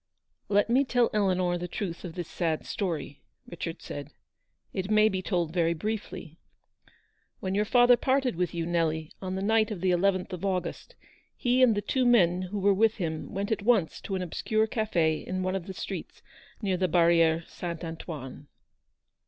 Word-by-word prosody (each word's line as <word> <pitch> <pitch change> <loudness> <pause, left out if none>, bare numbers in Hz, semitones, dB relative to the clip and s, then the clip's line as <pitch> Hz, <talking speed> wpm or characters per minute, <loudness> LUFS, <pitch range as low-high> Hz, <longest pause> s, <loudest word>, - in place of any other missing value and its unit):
"Let 205 0 +3
me 250 +4 +4
tell 245 -3 +2
Eleanor 185 -4 +1
the 175 - -4
truth 175 -1 -5
of 175 -3 -7
this 175 -3 -4
sad 165 -3 -2
story," 160 -8 -3 0.3
Richard 165 -1 -6
said, 145 0 -7 0.3
" - - -47
it 190 +1 -3
may 215 0 +5
be 190 -2 -2
told 175 -4 -1
very 170 -1 +2
briefly. 185 -3 -5 1.0
"When 190 0 -3
your 210 +2 +1
father 245 +2 +6
parted 260 -2 +1
with 175 -1 -1
you, 170 -1 -3
Nelly, 160 -2 -1
on 185 -1 -3
the 190 - -3
night 220 +1 +3
of 210 -5 -4
the 185 +1 +1
11th 185 +1 +1
of 180 0 -6
August, 185 -2 -3 0.4
he 250 0 +2
and 240 -4 +6
the 205 - -2
two 260 +5 0
men 180 -7 +4
who 185 +3 -4
were 200 0 +3
with 220 +3 +3
him 160 -5 -4
went 200 +2 -3
at 220 - 0
once 205 -6 +2
to 195 - -4
an 185 - -2
obscure 215 +5 0
cafe 175 -9 0
in 185 0 -4
one 185 +1 -1
of 190 -1 -4
the 190 - -5
streets - - -6 0.4
near 190 -3 +1
the 185 0 +1
Barriere 165 -1 +4
Saint 170 -1 -6
Antoine. 155 -4 -7
185 Hz, 185 wpm, -28 LUFS, 170-210 Hz, 1.0 s, father